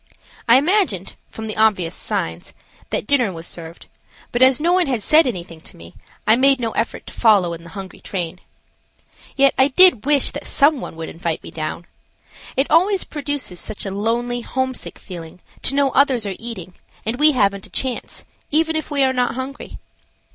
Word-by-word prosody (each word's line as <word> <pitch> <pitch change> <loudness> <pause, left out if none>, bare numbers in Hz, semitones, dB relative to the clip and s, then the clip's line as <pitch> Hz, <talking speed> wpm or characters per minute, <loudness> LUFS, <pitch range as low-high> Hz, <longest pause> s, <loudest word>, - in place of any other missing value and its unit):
I 235 - +8
imagined, 295 - +1 0.2
from 220 - -8
the 215 - -4
obvious 205 -6 +2
signs, 80 +1 -3 0.4
that - - -2
dinner 250 -5 +2
was 165 -1 -8
served, 165 0 -8 0.5
but 240 - -2
as 260 +1 +6
no 340 +3 +2
one 365 -3 +2
had 245 -6 -1
said 310 +4 +5
anything 170 -7 -5
to - - -13
me 85 +1 -13 0.3
I 220 - +6
made 270 +1 +4
no 230 -2 -2
effort 230 +1 -3
to - - -11
follow 200 -7 +3
in 165 0 -9
the 170 - -12
hungry 190 -1 -8
train. 180 -2 -5 1.0
Yet 275 -1 +4
I 265 - +6
did 285 - +6
wish 290 -2 +3
that - - -6
some 285 -1 +3
one - - -7
would 160 0 -6
invite 165 -1 -4
me - - -9
down. 155 +2 -5 0.7
It 270 - +3
always 375 +4 +3
produces 285 - -4
such 210 - -5
a 195 - -3
lonely, 235 +4 -1
homesick 260 +1 -3
feeling 170 -3 -10 0.2
to 275 - 0
know 280 -1 +2
others 260 -5 +3
are 200 - -3
eating, 205 -7 -5 0.3
and 230 +4 -2
we 305 0 +5
haven't 200 -5 0
a - - -22
chance, 260 -2 -3 0.2
even 320 +2 +1
if 315 - -3
we 285 -2 +1
are 260 0 +2
not 250 -2 0
hungry. 265 +2 -7
240 Hz, 190 wpm, -20 LUFS, 185-275 Hz, 1.0 s, I